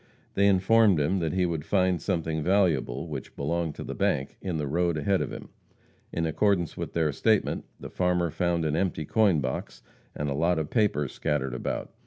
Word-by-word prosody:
They 100 0 +3
informed 100 -1 +4
him 90 +7 +1
that 80 -2 -1
he 90 -1 +2
would 80 -4 -2
find 90 -2 +1
something 80 -4 -1
valuable, 85 -9 +1
which - - -7
belonged 80 +2 -2
to - - -6
the - - -5
bank, 70 +1 -1
in 90 -4 -2
the 75 - -2
road 85 +3 0
ahead 95 +6 +1
of - - -3
him. - - -8 0.6
In 85 - -1
accordance 85 +1 +1
with - - -5
their 80 -2 +1
statement, 110 +8 +1
the - - -8
farmer 90 -2 +1
found 85 -1 0
the 75 - 0
empty 85 -3 -1
coin 100 -5 +3
box 65 -1 -4 0.3
and 75 - -3
a 70 - -1
lot 85 +4 +1
of 80 -1 -3
papers 100 - +1
scattered 70 -5 -2
about. 65 - -4
85 Hz, 195 wpm, -27 LUFS, 75-95 Hz, 0.6 s, informed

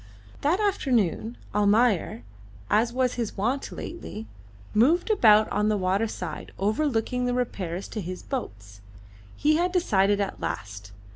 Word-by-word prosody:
That 330 +7 +2
afternoon 245 - 0 0.2
Almayer, 205 - +2 0.5
as 230 +3 +3
was 255 0 +1
his 230 -4 -4
wont 245 +8 -1
lately, 225 -10 -7 0.5
moved 315 - +3
about 215 - +6
on 210 +1 +1
the 210 - +1
water 190 +4 +1
side, - - -6
overlooking 245 +3 0
the 245 - 0
repairs 195 -7 -3
to 215 - -4
his 180 0 -6
boats. 105 - -6 0.6
He 305 +1 +3
had 355 +2 +1
decided 205 - +2
at 200 -1 -3
last. 100 0 -5
220 Hz, 135 wpm, -26 LUFS, 195-255 Hz, 0.6 s, about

